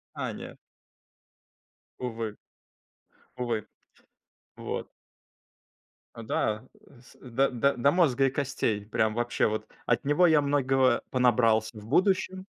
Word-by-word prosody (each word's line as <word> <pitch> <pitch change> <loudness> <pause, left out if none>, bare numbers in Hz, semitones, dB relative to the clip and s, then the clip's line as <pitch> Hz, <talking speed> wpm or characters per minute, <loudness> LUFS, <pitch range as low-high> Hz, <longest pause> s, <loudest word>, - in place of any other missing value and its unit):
А, - - -3
нет. - - -9 1.4
Увы. 115 -3 -4 1.0
Увы. 120 -4 -2 0.9
Вот. - - -5 1.3
А, 115 - -9
да. 110 -1 -1 0.4
С 125 - -19
да, 130 +2 +1
да, 135 +3 +1
до 140 +4 +4
мозга 140 -7 +3
и 135 - +1
костей. 120 -7 -1
Прям 110 0 0
вообще 120 +1 0
вот. 110 0 -3 0.2
От 120 +3 +1
него 150 +5 +4
я 155 -3 +5
многого 135 -3 +2
понабрался 115 -3 +2
в 105 - -10
будущем. 185 - +1
125 Hz, 115 wpm, -28 LUFS, 110-140 Hz, 1.4 s, я